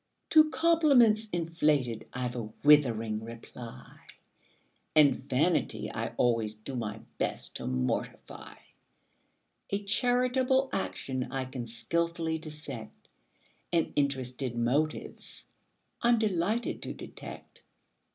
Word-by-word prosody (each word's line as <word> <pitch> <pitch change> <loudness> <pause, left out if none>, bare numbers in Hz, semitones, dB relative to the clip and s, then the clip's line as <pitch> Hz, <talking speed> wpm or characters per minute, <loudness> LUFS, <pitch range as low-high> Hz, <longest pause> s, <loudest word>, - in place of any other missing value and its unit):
To 310 -1 +7
compliments 280 -11 +4
inflated 155 -8 0
I've 125 -1 -3
a 110 -3 -5
withering 115 -7 +4
reply; 115 +1 -10 1.0
And 150 -3 +7
vanity 140 +6 0
I - - -4
always 115 -3 +1
do 110 +5 -7
my 110 -2 -4 0.2
best - - -3
to - - -6
mortify; 65 0 -3 1.1
A 200 +1 -2
charitable 255 +4 +2
action 130 -8 -3
I 135 -1 -2
can 130 -2 -6
skilfully 160 +8 -1
dissect: 150 -8 -9 0.6
And 170 -2 +1
interested 130 -3 -1
motives 135 +7 -2 0.6
I'm 240 0 +4
delighted 215 +2 0
to - - -5
detect. - - -10
145 Hz, 100 wpm, -30 LUFS, 120-200 Hz, 1.1 s, To